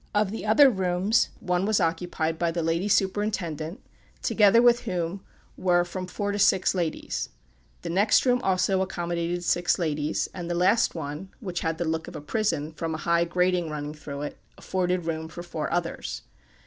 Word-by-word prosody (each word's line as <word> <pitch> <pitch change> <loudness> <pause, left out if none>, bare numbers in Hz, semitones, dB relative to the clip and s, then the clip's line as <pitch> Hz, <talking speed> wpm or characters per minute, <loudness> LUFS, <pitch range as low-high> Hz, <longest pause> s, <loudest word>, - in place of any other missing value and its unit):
Of 205 -2 +2
the 220 0 -5
other 275 +7 +7
rooms, 190 0 +2
one 180 +2 0
was 215 -1 +3
occupied 165 -1 -1
by 170 - +1
the 165 0 -2
lady 165 +4 0
superintendent, 190 -5 -1 0.4
together 210 +1 +5
with 240 0 +5
whom 180 +1 -3 0.3
were 175 -1 +3
from 185 +1 -5
four 205 +3 -2
to 205 - -2
six 190 -2 +4
ladies; 175 -4 -2 0.5
the 170 - -4
next 200 +8 +4
room 250 -1 +3
also 190 -1 +2
accommodated 175 -1 -2
six 175 0 +2
ladies, 155 -3 -1
and 175 -2 -6
the 175 - -1
last 180 +6 +3
one, 155 +4 -5
which 185 -6 -4
had 160 0 -2
the 170 - -2
look 160 0 -2
of - - -9
a - - -4
prison, 155 -3 -1
from 160 0 -3
a 155 - -7
high 170 0 +3
grating 180 -1 +1
running 150 -1 -4
through 145 -2 -7
it, 150 - -6 0.2
afforded 180 -2 -1
room 160 -1 -3
for 170 +2 -8
four 160 -3 -4
others. 170 -1 -3
175 Hz, 180 wpm, -26 LUFS, 165-190 Hz, 0.5 s, other